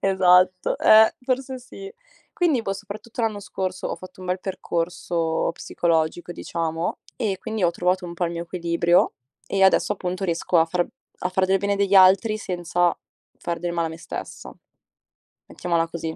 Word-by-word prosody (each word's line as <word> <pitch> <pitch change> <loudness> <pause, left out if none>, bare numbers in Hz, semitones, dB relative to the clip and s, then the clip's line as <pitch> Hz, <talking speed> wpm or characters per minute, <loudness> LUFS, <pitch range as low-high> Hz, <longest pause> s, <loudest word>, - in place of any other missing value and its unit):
Esatto, 185 -1 +3
eh, 220 0 +6
forse 260 +1 -2
sì. 390 - -10 0.4
Quindi 315 -9 +1
poi, 195 -2 -2
soprattutto 210 +4 -8
l'anno 220 -2 0
scorso, 185 -2 -4
ho - - -4
fatto 185 0 -13
un 185 - -8
bel 180 +1 -1
percorso 170 -3 -2
psicologico 170 0 -1
diciamo 165 -1 -3 0.2
e 205 -6 -1
quindi 220 0 -4
ho 170 - +4
trovato 180 +2 0
un 170 -1 -7
po' 175 +1 -1
il 170 - -4
mio 170 0 -4
equilibrio, 170 0 +1 0.3
e 195 - 0
adesso 190 +2 +4
appunto 185 -1 -4
riesco 170 0 +1
a 160 - +5
far 175 +1 0 0.4
a 180 - 0
fare 185 0 +1
del 190 +1 +3
bene 200 +1 0
degli 200 0 +1
altri 195 +3 +6
senza 175 -2 0 0.4
far 170 -1 -3
del 175 0 -2
male 170 -1 0
a - - -4
me 160 - -9
stessa. 165 - -8 1.0
Mettiamola 170 -2 -1
così. 165 -1 -5
180 Hz, 170 wpm, -23 LUFS, 170-200 Hz, 1.0 s, eh